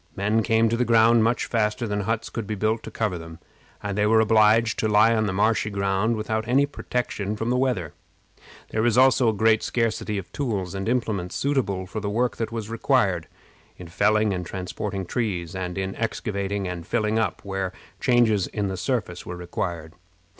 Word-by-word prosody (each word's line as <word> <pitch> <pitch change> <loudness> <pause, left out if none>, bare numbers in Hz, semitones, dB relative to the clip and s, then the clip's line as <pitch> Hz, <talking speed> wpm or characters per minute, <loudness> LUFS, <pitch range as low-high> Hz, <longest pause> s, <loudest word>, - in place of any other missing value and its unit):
Men 105 +3 +1
came 115 0 +3
to 115 - +1
the 125 - +1
ground 115 0 +5
much 115 +2 +1
faster 110 +1 0
than 105 -1 -1
huts 110 +3 -2
could 115 -3 -4
be 110 - -2
built 110 +3 0
to - - -8
cover 105 -6 -2
them, 80 0 -10 0.5
and 100 -1 -3
they 105 +1 +2
were 110 +1 +5
obliged 110 0 +4
to 110 - +1
lie 110 +2 +5
on 110 -1 +1
the - - -1
marshy 105 +2 +1
ground 100 +3 0
without 110 +1 -2
any 135 +3 +4
protection 120 -7 -3
from 115 +3 -2
the - - +2
weather. 125 - 0 0.8
There 110 - 0
was 120 0 +2
also 130 -2 +5
a - - +3
great 110 +1 +3
scarcity 115 -3 -1
of 90 -2 -6
tools 100 -10 -2
and 95 +2 -3
implements 110 -7 -1
suitable 125 -10 0
for 95 +4 -5
the 100 -1 -3
work 120 +4 0
that 115 - -3
was 115 -2 -4
required, 110 - +1 0.5
in 90 -2 -10
felling 105 +4 +2
and 90 -1 -3
transporting 95 +2 -4
trees, 90 -6 -2
and 90 0 -4
in 95 0 -3
excavating 100 -3 -2
and 90 -2 -6
filling 110 +1 +1
up, 110 -6 -1
where 95 -1 -2 0.3
changes 115 -6 +3
in 105 -2 -2
the 95 - -4
surface 105 -6 -2
were 90 - -5
required. 85 -2 -4
105 Hz, 195 wpm, -24 LUFS, 95-115 Hz, 0.8 s, ground